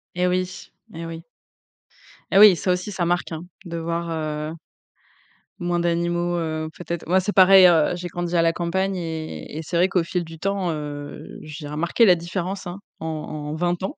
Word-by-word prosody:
Et 180 0 +2
oui, 185 0 -2 0.2
et 165 0 -6
oui. 165 0 -7 1.1
Et 195 - +4
oui, 205 -2 +9
ça 180 - 0
aussi 180 +3 -2
ça 185 -3 -1
marque 175 0 0
hein? 160 - -4 0.2
De 170 -1 -5
voir, 170 +1 -2
heu 155 -1 -3 1.1
moins 175 0 0
d'animaux, 175 0 0
heu, 155 -1 -3
peut-être 170 -1 -5
moi 185 +3 +3
c'est 205 +3 -2
pareil, 190 0 +8
heu, 165 -3 +4
j'ai 175 0 -5
grandi 175 0 -4
à - - +5
la 165 0 +3
campagne 190 +3 -1
et 160 -3 -5
et - - -3
c'est 165 - -5
vrai 180 +2 +4
qu'au 180 -3 +2
fil 180 0 -1
du 165 -1 -11
temps, 195 -1 -1
heu, 145 -1 -6
j'ai 155 0 -8
remarqué 170 +10 +2
la 185 -4 +7
différence 185 +3 -4
hein, 180 +2 -6 0.2
en - - -4
en 155 -1 -5
20 175 +2 -1
ans. 275 - -4
170 Hz, 195 wpm, -23 LUFS, 160-180 Hz, 1.1 s, oui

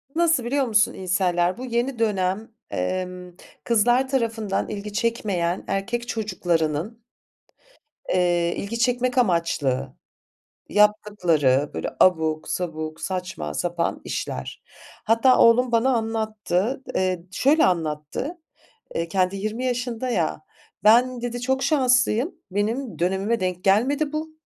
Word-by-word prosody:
nasıl 330 -6 +3
biliyor 270 +3 0
musun 215 -1 +3
incel'ler? 180 0 0
Bu 255 - -6
yeni 240 0 -1
dönem, 205 0 0 0.2
emm, 180 - -3 0.3
kızlar 240 +3 +3
tarafından 225 -6 -1
ilgi 205 0 -6
çekmeyen 205 -6 -1
erkek 235 +5 -2
çocuklarının, 185 -1 -2 1.1
eee, 175 -1 +1
ilgi 230 +4 -4
çekmek 250 +1 +1
amaçlı 160 - +1 0.7
yaptıkları 175 -10 +2
böyle - - -3
abuk 160 -3 +3
sabuk, 155 -3 -4
saçma 180 - -4
sapan 175 - -2
işler. - - -5 0.4
Hatta 230 +3 +4
oğlum 235 +1 +5
bana 235 +3 +3
anlattı. 220 +1 -1
Eee, 185 -2 0
şöyle 295 +8 +3
anlattı; 165 - -2 0.6
eee, 165 0 -1
kendi 185 +2 0
20 215 +5 -3
yaşında 250 0 -2
ya, 165 -8 -1 0.4
"Ben" 240 +3 +4
dedi, 245 0 -4
"çok 265 +1 0
şanslıyım, 255 - +2 0.2
benim 220 +5 -2
dönemime 190 +6 0
denk 185 -1 -2
gelmedi 275 +10 +2
bu." 315 +1 -5
210 Hz, 110 wpm, -23 LUFS, 180-245 Hz, 1.1 s, oğlum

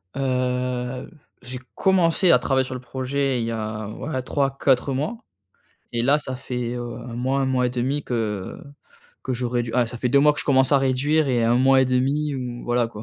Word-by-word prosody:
Heu, 125 -1 -2 0.3
j'ai 125 +1 -7 0.2
commencé 180 -1 +3
à - - +6
travailler 130 -1 +1
sur 130 - -6
le 125 - -6
projet 130 +1 -2
il 115 - -1
y 115 - -2
a, 110 -1 -4
ouais, 130 +3 -4
3-4 135 -1 +1
mois, 150 - -2 0.8
et 115 - 0
là 140 +4 +4
ça 130 -3 -5
fait, 125 -2 -4
heu, 120 -1 -5
1-1,5 130 +2 -1
que 105 -5 -3 0.7
que 130 - -2
j'aurais 120 0 -1
dû 115 - -6
heu, 125 -1 +3
ça 120 +1 -8
fait 125 - 0
2 140 +3 +4
mois 150 +1 +5
que - - -9
je - - -4
commence 135 -1 +3
à 140 - +6
réduire 135 +3 +1
et 120 -2 +1
1 120 +1 +3
mois 135 +1 +5
et - - +3
1/2 135 +4 0
ou, 125 -2 -5
voilà 120 0 +1
quoi. 110 -2 -9
130 Hz, 195 wpm, -23 LUFS, 120-135 Hz, 0.8 s, à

